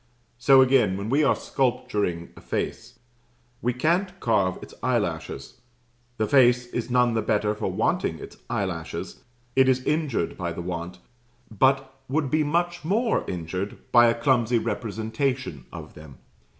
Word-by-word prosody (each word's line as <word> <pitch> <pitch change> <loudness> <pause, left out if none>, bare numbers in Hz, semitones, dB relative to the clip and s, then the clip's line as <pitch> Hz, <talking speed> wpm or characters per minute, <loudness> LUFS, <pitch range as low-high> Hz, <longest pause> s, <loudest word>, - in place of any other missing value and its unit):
So 130 +2 +7
again, 125 -8 +3
when 100 +3 -4
we 145 +3 +3
are 140 - +4
sculpturing 105 -9 -1
a - - -13
face, - - -4 0.6
we 125 - +1
can't 175 +9 0
carve 100 -6 +1
its - - -11
eyelashes. - - -2 0.6
The 110 - +1
face 125 -1 +4
is 120 0 -4
none 125 -1 +3
the 110 - +1
better 105 0 +1
for 105 - -3
wanting - - 0
its - - -11
eyelashes 90 -5 -4 0.3
it 130 0 +5
is 130 0 +2
injured 150 - -1
by 85 -2 -2
the 85 - -6
want; 85 0 -5 0.6
but 135 +3 +2
would 140 -1 0
be 155 0 +3
much 175 +3 -1
more 220 +8 +1
injured 90 +3 -4
by 120 -1 +7
a 115 0 +1
clumsy 120 -2 +2
representation 115 - -3
of - - -9
them. 75 -4 -13
120 Hz, 150 wpm, -25 LUFS, 100-135 Hz, 0.6 s, So